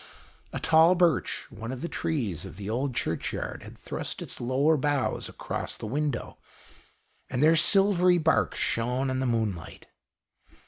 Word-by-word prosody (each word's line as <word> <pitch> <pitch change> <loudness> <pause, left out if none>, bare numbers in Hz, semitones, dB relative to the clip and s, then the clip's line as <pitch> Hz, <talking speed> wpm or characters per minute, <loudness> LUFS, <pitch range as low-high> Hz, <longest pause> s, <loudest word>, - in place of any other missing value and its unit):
A - - -4
tall 160 +3 +5
birch, 175 -5 +1
one 115 +2 -7
of 130 -1 -6
the 170 - -2
trees 115 - -2
of 95 -2 -9
the 100 -1 -7
old 130 +2 -2
Churchyard, 85 -9 -3
had - - -12
thrust - - -5
its - - -6
lower 135 +6 +2
boughs 145 -1 -1
across - - -4
the - - -7
window, 140 +3 -3 0.9
and 125 +2 0
their 160 +2 +6
silvery 180 +1 +4
bark 160 -1 +2
shone 125 +3 -1
in 130 - -1
the 130 - 0
moonlight. 110 -7 -3
135 Hz, 150 wpm, -27 LUFS, 115-160 Hz, 0.9 s, their